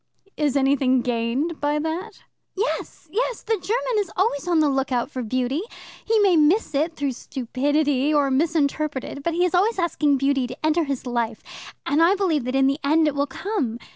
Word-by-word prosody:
"Is 290 -2 +1
anything 265 -2 +2
gained 245 +7 -1
by 290 +1 +1
that?" 335 +7 -4 0.3
"Yes, 445 +6 -3
yes. 485 +2 -1
The 450 - 0
German 445 +3 -1
is 400 -4 -2
always 360 -5 0
on 345 -2 +3
the 305 - +4
lookout 270 -2 -1
for 255 - -4
beauty. 255 +5 -1 0.4
He 450 - +1
may 390 -3 +4
miss 315 +6 +3
it 315 +4 0
through 285 -3 -1
stupidity, 275 +3 0
or 290 -2 +2
misinterpret 300 -1 0
it, 280 - -7
but 335 +3 -2
he 355 +1 +3
is 360 - -1
always 395 +5 +2
asking 305 -5 +1
beauty 270 -1 +1
to 255 +5 -6
enter 315 +1 +2
his 275 -3 -4
life, 235 -2 -2 0.4
and 295 +3 +2
I 350 +4 +5
believe 335 -10 0
that 255 +1 -2
in 270 0 +4
the 275 +2 +1
end 310 +3 +3
it 300 - 0
will 285 0 0
come. 305 - -3
295 Hz, 195 wpm, -23 LUFS, 270-340 Hz, 0.4 s, I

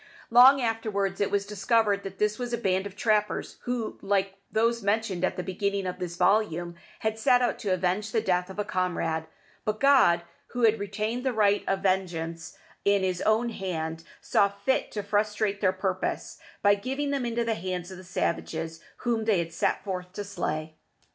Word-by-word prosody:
Long 255 +4 +8
afterwards 215 -5 -1
it 200 - +2
was 200 -1 0
discovered 205 0 +1
that 195 -1 -8
this 210 +2 0
was 245 -1 -3
a - - +1
band 190 -3 0
of 200 - -12
trappers 210 -1 0
who, 245 -3 -3
like 195 -1 +1 0.2
those 230 +1 +2
mentioned 200 -3 0
at 185 - 0
the 180 - -2
beginning 200 +1 -1
of 180 0 -4
this 175 -1 -4
volume, 180 -2 +1 0.3
had 220 0 -1
set 250 0 +4
out 240 - 0
to 205 - -3
avenge 185 +4 0
the 230 - +2
death 180 -2 0
of 190 - -9
a 210 - -1
comrade; 170 -4 -1 0.4
but 215 0 -2
God, 255 -12 +5 0.3
who 245 -1 -1
has 225 -1 +5
retained 215 +4 -2
the 260 -2 0
right 205 -2 +3
of 195 0 0
vengeance 170 -4 -1 0.3
in 200 -1 +3
his 185 -1 -1
own 225 +2 +2
hand, 165 -6 -4 0.2
saw 200 - +3
fit 200 +7 -1
to 210 - -3
frustrate 210 0 0
their 185 -3 +4
purpose, 185 0 -3 0.2
by 205 0 +6
giving 270 +8 -2
them 275 -2 0
into 235 0 -1
the 230 - +1
hands 180 -1 -4
of 185 - -8
the 185 - -11
savages 165 -2 -2 0.3
whom 230 -2 +1
they 215 -3 +3
had 165 -1 -2
set - - 0
forth 180 -2 -5
to 205 - -4
slay. 155 -5 -4
200 Hz, 190 wpm, -27 LUFS, 185-220 Hz, 0.4 s, Long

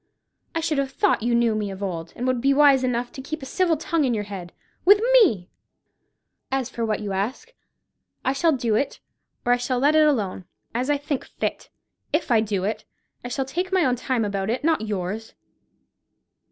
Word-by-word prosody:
I 330 - 0
should 310 -3 0
have 275 -1 0
thought 375 - +1
you 235 +1 +1
knew 235 -1 +3
me 210 -1 -2
of 195 +1 -6
old, 170 -4 -4
and 245 - -4
would 255 -2 +1
be 275 +2 +3
wise 280 -2 +6
enough 245 -1 -1
to 280 - -8
keep 300 +2 -6
a - - -5
civil 340 +4 +1
tongue 330 0 0
in 250 -4 +1
your 210 - -2
head, 190 -4 -7 0.3
with 405 +3 +7
me. 225 - +4 1.0
As 265 -1 -1
for 235 - -3
what 215 -1 -1
you 205 -1 -4
ask, 250 - -3 0.7
I 260 - +2
shall 325 +4 +3
do 240 -6 0
it, 265 +6 0 0.5
or 245 - +4
I - - +3
shall 245 +1 -1
let 285 +4 +3
it 310 0 +6
alone—as 230 +1 -3
I 290 - +3
think 285 -1 -3
fit. - - -4 0.4
If 310 -4 0
I 225 -2 +5
do 205 -4 -1
it, 215 +2 -2 0.4
I - - -4
shall 265 +2 -2
take 360 +7 -3
my 375 -3 +3
own 250 - +2
time 250 -2 -1
about 200 0 -2
it, 250 +5 -1
not 320 -3 +2
yours." 210 +1 -4
250 Hz, 205 wpm, -24 LUFS, 215-290 Hz, 1.0 s, with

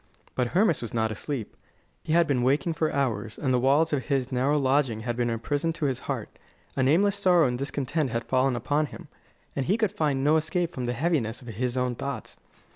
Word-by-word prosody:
But 125 -1 0
Hermas 190 -6 +3
was 120 +1 -6
not 110 -1 +1
asleep. 115 +1 -5 0.5
He 155 - -1
had 170 0 +5
been 140 -5 +1
waking 140 +6 +2
for 160 0 0
hours, 115 -6 -1
and 130 -3 0
the 125 - +3
walls 145 +5 +3
of 135 -3 0
his 135 -3 0
narrow 135 +4 +2
lodging 130 -5 +1
had 120 +1 -2
been 120 0 0
a 115 - -1
prison 145 +7 -1
to 165 -2 -3
his 135 -3 0
heart. - - -4 0.4
A 135 - 0
nameless 175 +10 +3
sorrow 175 -3 +4
and 125 - -1
discontent 140 +1 -1
had 115 0 -2
fallen 130 0 +2
upon 145 +6 0
him, - - -11 0.5
and 135 - -1
he 200 +5 +3
could 215 -4 +1
find 150 -9 0
no 150 +2 +4
escape 170 +2 -1
from 125 -2 -3
the 120 - 0
heaviness 130 -4 -1
of 120 - -9
his 120 +3 -2
own 125 -1 0
thoughts. 140 +3 -5
135 Hz, 220 wpm, -27 LUFS, 125-155 Hz, 0.5 s, had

